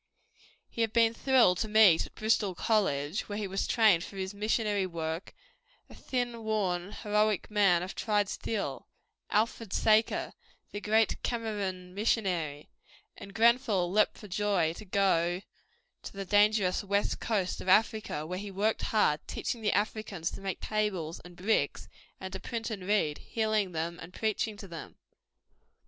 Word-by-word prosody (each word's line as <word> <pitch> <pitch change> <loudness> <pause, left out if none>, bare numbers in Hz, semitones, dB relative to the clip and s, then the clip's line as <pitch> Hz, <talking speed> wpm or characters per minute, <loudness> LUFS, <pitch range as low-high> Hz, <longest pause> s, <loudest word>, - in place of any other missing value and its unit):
He 230 - -5
had 225 -1 0
been 230 -1 +4
thrilled 235 -7 +3
to 220 - -1
meet 210 -6 +5
at - - -23
Bristol 215 -3 +1
College, 180 -6 0
where 205 - -3
he 210 -2 -2
was 195 +1 -2
trained 215 -8 +4
for 195 - -9
his 190 +1 -4
missionary 210 -1 0
work, 165 0 -4 0.6
a - - -11
thin, 240 -3 -3
worn, 195 -4 -1
heroic 210 -2 0
man 195 -5 +4
of 185 - -6
tried 210 -2 0
steel, 215 +2 -4 0.4
Alfred 220 -1 0
Saker, 220 0 +2 0.4
the 205 - -5
great 220 +1 +2
Kamerun 200 -6 -3
missionary, 180 -8 -1 0.5
and 200 +1 -11
Grenfell 230 -6 +3
leapt 210 +1 +2
for 210 - -11
joy 190 -4 +1
to 215 - -11
go 180 -3 +2
out 185 - -8 0.6
to - - -9
the 195 0 -5
dangerous 205 -1 +3
West 200 +1 0
Coast 200 -5 -1
of 185 - -4
Africa, 215 -6 +2
where 180 +3 -4
he 205 0 -6
worked 205 +3 0
hard, 155 -9 +2
teaching 235 - -3
the 210 -2 +1
Africans 205 -5 -2
to - - -9
make 195 -2 -4
tables 195 -7 -2
and 175 0 -14
bricks 200 +5 0 0.3
and 190 0 -7
to 190 - -4
print 225 +3 -4
and 190 -4 -6
read, 195 -8 +1
healing 215 -4 -1
them 170 +1 -3
and 175 +2 -11
preaching 220 -1 -1
to 200 - -9
them. 170 -2 -9
205 Hz, 160 wpm, -30 LUFS, 180-220 Hz, 0.6 s, meet